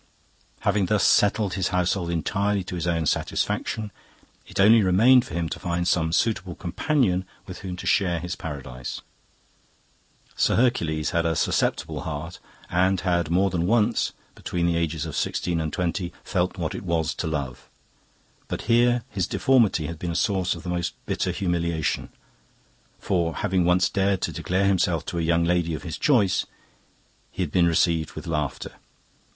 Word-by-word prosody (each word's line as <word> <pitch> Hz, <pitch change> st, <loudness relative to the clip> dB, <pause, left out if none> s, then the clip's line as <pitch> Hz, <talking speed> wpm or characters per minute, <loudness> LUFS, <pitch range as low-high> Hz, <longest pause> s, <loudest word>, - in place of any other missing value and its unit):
"Having 100 Hz, -1 st, +1 dB
thus 105 Hz, +1 st, +2 dB
settled 105 Hz, -1 st, +3 dB
his 95 Hz, -1 st, 0 dB
household 90 Hz, 0 st, 0 dB
entirely 100 Hz, +4 st, 0 dB
to 90 Hz, -, -8 dB
his 90 Hz, -1 st, -3 dB
own 85 Hz, -2 st, 0 dB
satisfaction, 105 Hz, +7 st, -1 dB, 0.6 s
it -, -, -7 dB
only 110 Hz, +3 st, +7 dB
remained 115 Hz, +7 st, +5 dB
for 85 Hz, -, -8 dB
him 85 Hz, -1 st, -1 dB
to -, -, -5 dB
find 85 Hz, -1 st, -2 dB
some 80 Hz, -3 st, +1 dB
suitable 95 Hz, -2 st, 0 dB
companion 95 Hz, -, 0 dB, 0.2 s
with 90 Hz, -, -8 dB
whom 95 Hz, -2 st, -5 dB
to -, -, -8 dB
share 90 Hz, -3 st, +2 dB
his 90 Hz, +1 st, -4 dB
paradise. 65 Hz, -7 st, -6 dB, 1.3 s
Sir -, -, +2 dB
Hercules 80 Hz, -11 st, +1 dB
had 85 Hz, -2 st, +1 dB
a 80 Hz, -, 0 dB
susceptible -, -, 0 dB
heart, 80 Hz, +2 st, -6 dB, 0.3 s
and 95 Hz, +1 st, +2 dB
had 85 Hz, -3 st, 0 dB
more 95 Hz, +3 st, +2 dB
than 85 Hz, -1 st, 0 dB
once, 110 Hz, 0 st, +2 dB, 0.2 s
between 85 Hz, -1 st, -3 dB
the 85 Hz, -1 st, +2 dB
ages 80 Hz, -2 st, -1 dB
of -, -, -6 dB
sixteen 85 Hz, -2 st, -1 dB
and 80 Hz, -1 st, -3 dB
twenty, 90 Hz, 0 st, -2 dB
felt 90 Hz, 0 st, -1 dB
what 85 Hz, -3 st, -2 dB
it -, -, -5 dB
was 85 Hz, -3 st, -1 dB
to 85 Hz, -, -4 dB
love. 70 Hz, -5 st, -4 dB, 0.8 s
But -, -, -4 dB
here 120 Hz, 0 st, +3 dB
his 95 Hz, -8 st, -2 dB
deformity 115 Hz, -, +2 dB
had 85 Hz, 0 st, -6 dB
been 90 Hz, -, -3 dB
a 85 Hz, -, -3 dB
source 95 Hz, -3 st, +1 dB
of -, -, -10 dB
the 90 Hz, -, -5 dB
most 85 Hz, -1 st, -2 dB
bitter -, -, -1 dB
humiliation, 85 Hz, -5 st, -1 dB, 0.9 s
for, 85 Hz, -3 st, -1 dB
having 90 Hz, -2 st, +1 dB
once 90 Hz, +2 st, +4 dB
dared 95 Hz, -1 st, 0 dB
to -, -, -1 dB
declare 95 Hz, +2 st, 0 dB
himself 90 Hz, -3 st, +1 dB
to 85 Hz, -, -3 dB
a -, -, 0 dB
young 85 Hz, +1 st, +2 dB
lady 85 Hz, -1 st, +1 dB
of -, -, -8 dB
his 85 Hz, -3 st, -6 dB
choice, 120 Hz, -, +2 dB, 0.8 s
he 95 Hz, -, -2 dB
had 80 Hz, -, -4 dB
been 85 Hz, 0 st, +4 dB
received 85 Hz, -2 st, +1 dB
with -, -, -8 dB
laughter. 75 Hz, -5 st, -3 dB
90 Hz, 170 wpm, -25 LUFS, 85-100 Hz, 1.3 s, only